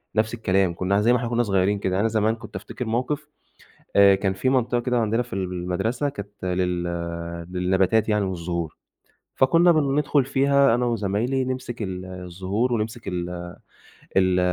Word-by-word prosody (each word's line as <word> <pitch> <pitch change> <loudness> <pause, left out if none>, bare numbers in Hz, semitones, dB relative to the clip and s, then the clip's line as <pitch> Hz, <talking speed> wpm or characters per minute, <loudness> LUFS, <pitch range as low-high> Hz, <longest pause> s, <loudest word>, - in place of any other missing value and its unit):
نفس 110 +1 +1
الكلام، 95 -5 +1
كنّا 100 +3 +1
زي 115 +3 +4
ما 125 - +4
إحنا 120 0 -3
كنّا 120 0 +1
صغيّرين 100 -1 +1
كده، 95 - -1
يعني 95 - +1
أنا 115 - +3
زمان 110 0 +1
كنت 115 - -12
أفتكر 125 - -6
موقِف 130 +7 -2 0.7
آآ، 100 -1 +7
كان 95 0 -1
فيه 100 +7 0
منطقة 125 -2 +1
كده 125 0 0
عندنا 115 +2 +1
في 120 - -11
المدرسة 95 +8 -2
كانت 100 -7 -9
لل 90 -1 0 0.7
للنباتات 95 +4 +2
يعني 105 -1 +2
والزهور، 85 -3 -4 0.6
فكُنّا 165 +6 +5
بندخُل 145 -2 +2
فيها 140 -1 +3
أنا 120 +1 +1
وزمايلي 115 +4 0
نمسِك 130 -2 -4
ال 95 -2 -4
الزهور 95 +6 -3
ونمسِك 110 0 -3
ال 90 -1 -4 0.7
ال 95 -1 +4
105 Hz, 160 wpm, -24 LUFS, 95-125 Hz, 0.7 s, آآ